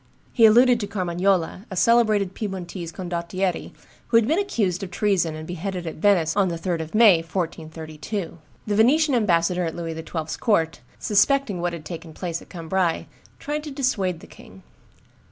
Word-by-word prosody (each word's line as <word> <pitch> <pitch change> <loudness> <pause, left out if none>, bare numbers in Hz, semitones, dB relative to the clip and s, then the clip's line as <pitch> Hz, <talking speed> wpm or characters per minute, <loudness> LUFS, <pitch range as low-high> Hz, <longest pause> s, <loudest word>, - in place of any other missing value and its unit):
He 230 -3 +7
alluded 240 +2 +5
to 205 - -3
Carmagnola, 185 0 0
a 190 - -6
celebrated 215 -3 +3
Piedmontese 185 -5 -5
condottiere, 175 +1 -3 0.4
who 230 - +4
had 230 -1 +3
been 320 +7 +2
accused 210 - -1
of 195 - -5
treason 180 -4 0
and 155 0 -7
beheaded 180 +1 -4
at 160 - -5
Venice 165 -3 +2
on 200 -2 +3
the 170 - -2
3d 170 0 -2
of 160 +5 -7
May, 215 -5 +7
1432. 165 +1 -5 0.3
The 210 - -1
Venetian 280 +7 +4
ambassador 180 -5 +2
at 165 -2 -3
Louis 165 -1 -4
XII.'s 160 0 -5
court, 165 - +1 0.2
suspecting 215 -2 +2
what 175 0 -1
had 160 -3 -8
taken 165 0 -8
place 170 -2 -4
at - - -16
Cambrai, 170 0 -1 0.3
tried 295 +1 -4
to 305 - -6
dissuade 220 - -1
the - - -12
king. 95 +1 -15
185 Hz, 170 wpm, -23 LUFS, 165-215 Hz, 0.4 s, He